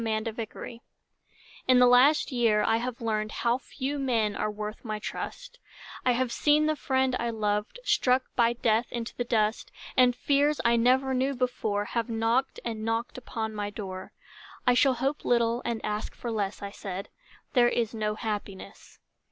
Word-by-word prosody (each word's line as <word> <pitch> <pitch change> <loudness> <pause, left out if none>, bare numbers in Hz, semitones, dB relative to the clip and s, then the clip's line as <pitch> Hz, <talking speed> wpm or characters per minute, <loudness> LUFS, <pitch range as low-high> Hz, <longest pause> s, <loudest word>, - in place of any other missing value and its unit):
Red 220 0 -1
Maples 230 +1 -7 0.9
In 255 -1 +6
the 250 - +7
last 255 +6 +5
year 230 -4 +3
I 225 - +3
have 245 +1 -4
learned 215 -1 -1
How 240 +1 0
few 275 +2 -4
men 225 -6 +1
are 215 - -1
worth 210 +1 -6
my 215 -3 -3
trust; - - -6 0.4
I 250 - +3
have 250 0 0
seen 300 +3 +3
the 310 0 +1
friend 265 -2 +1
I 235 - -1
loved 210 - -1
Struck 255 - +3
by 235 -1 +3
death 230 0 +1
into 235 -1 -5
the 245 - -1
dust, 220 -2 0 0.2
And 250 -1 +5
fears 285 +3 +2
I 235 0 +5
never 260 +3 +3
knew 265 +2 0
before 220 -5 -1
Have 230 +2 -2
knocked 230 +3 0
and 220 -2 -3
knocked 225 +3 -2
upon 220 -3 -4
my 205 -1 -3
door 190 -3 -7 0.5
"I 250 - +5
shall 260 +1 +4
hope 270 +4 -2
little 235 0 +2
and 235 -2 -1
ask 210 0 -3
for 240 - -5
less," 205 -2 -2
I 200 - -5
said, 195 -1 -6 0.4
"There 240 -2 +5
is 235 -2 -1
no 210 -1 -1
happiness." 210 -3 -6
235 Hz, 175 wpm, -28 LUFS, 215-255 Hz, 0.9 s, the